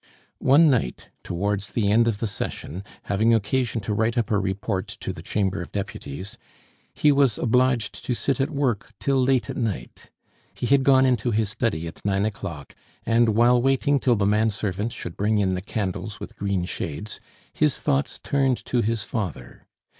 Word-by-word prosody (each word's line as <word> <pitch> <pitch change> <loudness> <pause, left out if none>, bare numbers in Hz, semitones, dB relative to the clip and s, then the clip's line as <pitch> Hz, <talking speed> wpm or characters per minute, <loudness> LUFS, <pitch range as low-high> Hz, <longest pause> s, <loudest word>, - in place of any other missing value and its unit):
One 145 +5 +6
night, 125 - 0
towards 100 +2 -2
the 105 -3 +1
end 115 +2 +4
of 115 -3 +1
the 115 - -2
session, 95 -3 -5 0.2
having 110 +3 +3
occasion 115 +2 0
to 105 +1 -2
write 115 +3 0
up 115 -3 0
a 105 - +3
report 95 0 -2
to - - -3
the - - -9
Chamber 100 -2 -1
of 85 - -8
Deputies, 95 -2 -6 0.6
he 150 - +4
was 140 -6 +3
obliged 125 -1 +1
to 125 - 0
sit 135 +5 0
at 135 - +1
work 130 -9 -1
till 135 -1 +2
late 130 -1 +2
at - - -5
night. 105 - -4 0.5
He - - -3
had 140 +2 +4
gone 130 -1 +5
into 125 -3 +1
his 110 -2 +1
study 105 -8 -1
at 80 - -9
nine 100 0 +1
o'clock, 95 -9 -5 0.3
and, 115 -1 +3
while 120 +2 +5
waiting 135 +2 +2
till 125 -3 +3
the 100 -2 +1
man 105 +2 +3
servant 105 +1 -2
should 85 - -7
bring 105 +2 +1
in 95 -2 +2
the 90 - -2
candles 105 +1 -4
with - - -8
green 100 -3 -1
shades, 90 +3 -5 0.3
his 150 -3 +2
thoughts 140 -1 0
turned 135 -3 +2
to 125 - +1
his 115 -1 -1
father. 95 - -5
110 Hz, 185 wpm, -24 LUFS, 100-125 Hz, 0.6 s, One